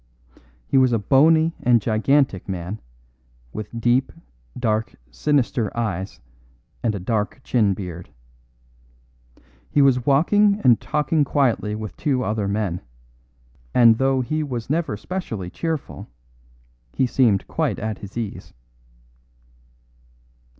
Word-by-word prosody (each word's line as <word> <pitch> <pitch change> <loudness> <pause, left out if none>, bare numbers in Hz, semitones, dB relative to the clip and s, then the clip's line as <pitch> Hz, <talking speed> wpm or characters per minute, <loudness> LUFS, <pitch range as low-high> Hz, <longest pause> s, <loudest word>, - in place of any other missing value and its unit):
He 135 - +3
was 130 -1 +4
a - - +3
bony 155 - +4
and 120 -1 +4
gigantic 110 -1 +1
man, 95 +3 -5 0.7
with 110 +2 -6
deep, 120 +3 +2 0.5
dark, 110 -3 -1 0.2
sinister 120 - 0
eyes 100 -5 -3 0.6
and 110 - 0
a - - -4
dark 105 +4 -2
chin 105 -6 +2
beard. 90 -3 -7 1.6
He - - +1
was 125 -2 +3
walking 200 - +3
and 120 -3 +5
talking 150 +1 +1
quietly 120 -7 0
with 110 0 -6
two 135 -5 0
other 105 -3 -1
men; 100 -4 -2 0.9
and 115 -2 +6
though 135 0 +2
he 155 +5 -2
was 125 -4 -4
never 160 -9 -1
specially 110 - -5
cheerful, 160 - -4 0.9
he 130 - +2
seemed 120 -6 +2
quite - - -1
at 110 -2 -4
his 100 +2 -10
ease. 110 -4 -6
120 Hz, 115 wpm, -22 LUFS, 105-135 Hz, 1.6 s, and